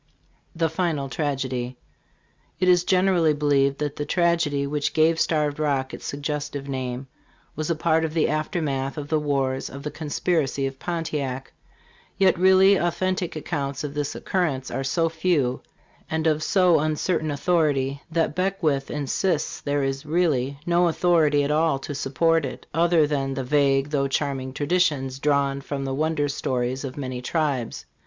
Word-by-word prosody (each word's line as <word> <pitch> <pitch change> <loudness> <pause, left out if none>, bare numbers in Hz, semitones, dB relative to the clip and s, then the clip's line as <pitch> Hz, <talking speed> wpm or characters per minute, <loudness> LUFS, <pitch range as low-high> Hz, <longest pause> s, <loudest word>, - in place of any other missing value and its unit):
* - - -37
:'; - - -39
THE 165 0 +2
FINAL 160 -4 -1
TRAGEDY. 130 -4 -2 0.8
IT 185 - +2
is 180 -1 +5
generally 180 -4 +3
believed 140 -2 +2
that 145 -1 -3
the 145 - -2
tragedy 165 -5 +1
which 145 0 -2
gave 160 +1 +3
Starved 150 -2 +1
Rock 140 -3 0
its - - -8
suggestive 145 -1 -4
name 130 -1 -4 0.5
was 155 +1 -3
a 170 - +1
part 160 0 +2
of 160 0 -3
the 160 - +3
aftermath 155 -3 -2
of 145 -1 -5
the 155 - +2
wars 135 -3 -1
of 140 +1 -9
the 150 - -4
conspiracy 150 -3 -1
of 135 0 -5
Pontiac; 145 -6 -3 0.6
yet 190 -1 +4
really 190 +1 +6
authentic 180 0 -1
accounts 140 -3 -3
of 145 -1 -4
this 145 -1 -3
occurrence 145 -9 -1
are 135 +2 -2
so 165 +5 +1
few 160 -6 0 0.5
and 160 0 -1
of 155 -1 +2
so 180 0 +4
uncertain 155 +1 0
authority 145 -3 +1
that 160 -2 0
Beckwithf 175 -8 0
insists 150 +3 -1
there 145 -1 0
is 135 +1 -2
really 150 -5 0
no 175 0 +3
authority 160 -4 +3
at 140 - 0
all 155 -1 +2
to 135 +2 -6
support 160 +4 +1
it, 130 -2 -6
other 165 -1 +4
than 135 -2 -1
the 135 - -2
"vague, 140 +1 +2
though 140 -2 +1
charming, 135 -1 -2
traditions 145 -3 0
drawn 140 -1 +1
from 140 0 -4
the 135 - -2
wonder 155 +1 0
stories 130 -2 -2
of 135 -1 -6
many 130 -3 -4
tribes." 140 -4 -2
150 Hz, 160 wpm, -24 LUFS, 135-165 Hz, 0.8 s, really